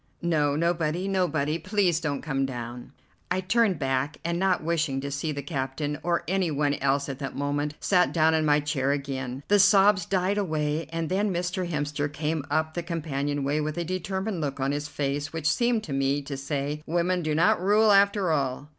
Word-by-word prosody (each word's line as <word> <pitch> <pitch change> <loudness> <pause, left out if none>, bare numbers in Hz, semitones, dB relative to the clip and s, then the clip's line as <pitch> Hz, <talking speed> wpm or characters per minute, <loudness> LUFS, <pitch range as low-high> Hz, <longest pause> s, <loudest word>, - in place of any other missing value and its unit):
"No, 150 -4 +2
nobody, 170 +2 0
nobody. 170 -5 0
Please 185 -2 +1
don't 145 -4 -3
come 135 -3 -1
down." 120 -2 -5 0.4
I 180 +1 +1
turned 200 0 +2
back, 135 +2 -1
and 170 0 -1
not 185 -3 +1
wishing 160 -4 0
to 140 0 -4
see 145 +3 -2
the 140 -1 -5
captain 145 +1 -3
or 170 0 0
any 190 -1 +1
one 145 -1 +1
else 140 0 0
at 135 -1 -5
that 135 - -5
moment, 145 +1 -2
sat 180 -2 +3
down 160 -1 +3
in 160 -1 +2
my 150 -1 +3
chair 140 -2 0
again. 135 -2 -3
The 205 0 +4
sobs 195 -2 +5
died 190 +2 +1
away, 155 -4 -1
and 165 -1 -2
then 200 +3 0
Mr. 180 0 -2
Hemster 145 -2 -2
came 155 0 -2
up 155 +1 0
the 175 - -2
companion 145 -4 -2
way 145 +3 0
with 150 +1 -3
a 170 - -1
determined 190 +1 -3
look 140 -2 -3
on 135 +1 0
his 145 +1 -3
face 145 0 -2
which 160 -2 -2
seemed 235 +6 +2
to 150 - -5
me 135 +1 0
to 140 0 -5
say, 140 +2 -3
"Women 175 +2 +1
do 155 -2 -1
not 170 +2 +3
rule 210 +3 +4
after 200 -2 +4
all." 140 -1 -1
155 Hz, 200 wpm, -26 LUFS, 145-180 Hz, 0.4 s, sobs